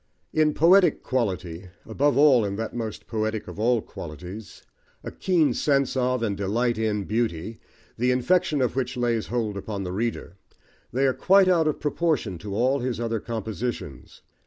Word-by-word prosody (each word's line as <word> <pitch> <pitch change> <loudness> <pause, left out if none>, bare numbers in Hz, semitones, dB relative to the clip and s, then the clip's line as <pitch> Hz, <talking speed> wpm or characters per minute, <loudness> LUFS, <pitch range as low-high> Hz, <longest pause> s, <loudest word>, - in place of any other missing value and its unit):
In 155 -1 +2
poetic 180 +4 +5
quality, 90 -8 -2 0.2
above 140 +6 +1
all 140 -5 +6
in 100 -1 -2
that 110 +1 -4
most 115 -3 -5
poetic 110 -1 -3
of - - -9
all 115 0 +2
qualities, 90 +7 -9 0.4
a - - -6
keen 170 -5 +1
sense 140 -3 +1
of, 125 -1 0
and 105 -3 0
delight 110 +4 0
in 105 -2 0
beauty, 110 -2 -2 0.4
the 125 +1 +2
infection 145 +3 +2
of 125 - -1
which 130 -1 -2
lays 120 -2 0
hold 110 -4 -2
upon 100 0 -5
the 90 - -4
reader, 105 -4 -3 0.5
they 130 +4 +1
are 130 - +3
quite 195 +5 +4
out 170 -4 +3
of 155 - -1
proportion 145 - -1
to 100 +2 -6
all 130 +5 +2
his 125 -2 -3
other 115 -1 -1
compositions. 110 - -5
120 Hz, 165 wpm, -25 LUFS, 105-135 Hz, 0.5 s, all